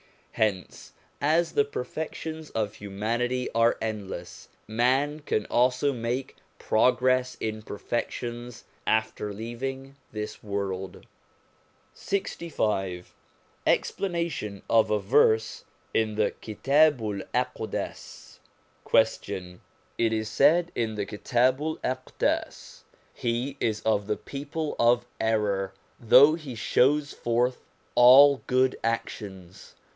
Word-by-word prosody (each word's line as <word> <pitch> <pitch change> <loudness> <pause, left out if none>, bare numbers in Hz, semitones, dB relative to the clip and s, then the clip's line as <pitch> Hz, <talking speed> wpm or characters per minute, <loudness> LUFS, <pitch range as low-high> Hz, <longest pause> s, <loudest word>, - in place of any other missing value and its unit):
Hence, 100 -4 -2 0.3
as 160 +4 +2
the 145 - +2
perfections 155 +3 -5
of 110 -2 -2
humanity 115 +5 -2
are 115 +1 +3
endless, 105 -3 -6 0.2
man 130 +7 +1
can 110 -8 -1
also 125 +3 +2
make 120 +2 -3 0.2
progress 125 +2 +2
in 110 0 -3
perfections 120 +2 -5 0.2
after 110 -1 0
leaving 130 +6 -6
this 105 0 -6
world. 100 -2 -4 0.9
LXV 105 - -2 0.6
EXPLANATION 170 - -1
OF 115 -1 +4
A 105 - +2
VERSE 110 +1 +2 0.3
IN 110 -1 +1
THE 105 -1 +1
KITABU'L 120 -3 +1
AQDAS - - -4 0.4
Question. 100 -5 0 0.4
It 115 -1 +2
is 110 0 -2
said 165 +8 +4
in 110 -2 -2
the 105 -1 -2
Kitabu'l 130 +9 0
Aqdas: 130 0 -2 0.2
' - - -36
He 125 +4 -2
is 110 -2 -1
of 105 -2 0
the 105 - -1
people 145 +2 -5
of 120 +1 +4
error, 105 -3 0 0.3
though 130 +6 +7
he 155 -6 -6
shows 140 +5 +2
forth 120 +2 0 0.3
all 135 +3 +8
good 130 0 +2
actions.' 95 -5 -5
120 Hz, 100 wpm, -27 LUFS, 105-135 Hz, 0.9 s, all